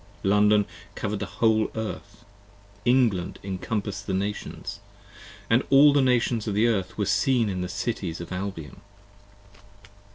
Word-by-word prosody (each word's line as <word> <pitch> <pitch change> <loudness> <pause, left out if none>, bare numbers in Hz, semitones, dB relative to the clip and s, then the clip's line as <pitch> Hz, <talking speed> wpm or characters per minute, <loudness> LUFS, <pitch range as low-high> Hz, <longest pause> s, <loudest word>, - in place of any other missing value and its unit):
London 105 +1 +4 0.3
cover'd 105 0 -3
the 100 - -4
whole 110 -1 +2
Earth, 110 -1 -6 0.6
England 120 -8 +2
encompass'd 100 +1 -4
the 95 - -1
Nations, 100 +2 -4 0.7
And 115 +3 +4
all 140 +1 +7
the 140 - +4
Nations 120 -3 +1
of 105 - -1
the 110 +3 +3
Earth 95 -5 -1
were 105 - 0
seen 120 0 +2
in 90 -2 -3
the 90 - -3
Cities 95 -4 -3
of 85 +1 -8
Albion. 90 -5 -6
105 Hz, 135 wpm, -25 LUFS, 95-115 Hz, 0.7 s, all